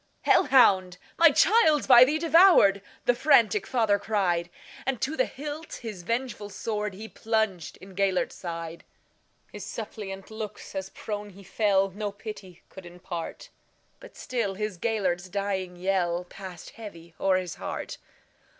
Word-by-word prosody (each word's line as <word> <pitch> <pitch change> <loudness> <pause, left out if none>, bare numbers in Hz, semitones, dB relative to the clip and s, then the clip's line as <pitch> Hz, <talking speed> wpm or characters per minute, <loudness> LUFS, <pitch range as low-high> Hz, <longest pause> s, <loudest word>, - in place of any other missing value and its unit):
"Hell - - +4
hound! 185 -9 +4 0.2
my 335 0 +7
child 315 -2 +4
's - - -5
by 245 -2 +9
thee 290 +4 +2
devoured,"The 315 - +4
frantic 235 -7 +3
father 220 -5 +2
cried; 185 -5 0 0.3
And 265 -3 -2
to 270 +7 -2
the - - +1
hilt 295 +4 -7
his 215 -6 -6
vengeful 230 0 -3
swordHe 210 0 -5
plunged 220 -6 -2
in 190 0 -14
Gêlert's 190 -1 0
side. 165 -1 -7 0.7
His - - -8
suppliant 195 -2 -7
looks, 220 -1 -7
as 190 -1 -4
prone 210 0 -6
he 200 0 -14
fell, 195 0 +1
No 205 +2 -4
pity 200 -4 -10
could 190 -2 -12
impart; 175 -1 -7 0.5
But - - -14
still 230 -6 -2
his 210 -3 -4
Gêlert's 185 -5 -1
dying 190 -2 -3
yellPassed 180 0 -3
heavy 170 -7 -11
o'er 190 -1 +3
his 180 -2 -4
heart. - - -5
200 Hz, 140 wpm, -27 LUFS, 185-230 Hz, 0.7 s, by